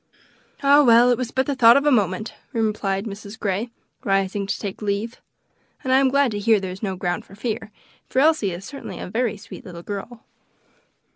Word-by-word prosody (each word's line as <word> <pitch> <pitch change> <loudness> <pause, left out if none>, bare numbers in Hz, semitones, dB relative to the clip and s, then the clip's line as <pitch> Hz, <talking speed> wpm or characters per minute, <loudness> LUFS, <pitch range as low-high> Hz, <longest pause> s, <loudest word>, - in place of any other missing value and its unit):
"Ah! 285 +1 +7
well; 240 0 +6
it 245 - +2
was 250 -2 -2
but 265 +2 0
the 285 - -1
thought 235 -2 +7
of 280 - +1
a 295 - +4
moment," 210 -2 0 0.2
replied 210 -3 -1
Mrs. 205 0 -8
Grey, 205 +4 -2 0.3
rising 195 0 0
to - - -1
take 200 -1 -6
leave, 210 +3 -3 0.6
"and 260 - +1
I 265 - +6
am 270 -1 +3
glad 280 -2 +2
to 205 - -3
hear 215 +1 +3
there 190 -1 -5
is 185 - -9
no 195 -4 -2
ground 175 -1 -2
for 195 - -16
fear, 220 0 -4 0.4
for - - -7
Elsie 295 -7 +4
is 180 +2 -7
certainly 275 +4 -8
a - - -6
very 225 +2 -1
sweet 215 - -11
little 175 -5 -10
girl." 210 +4 -7
215 Hz, 205 wpm, -22 LUFS, 195-250 Hz, 0.6 s, Ah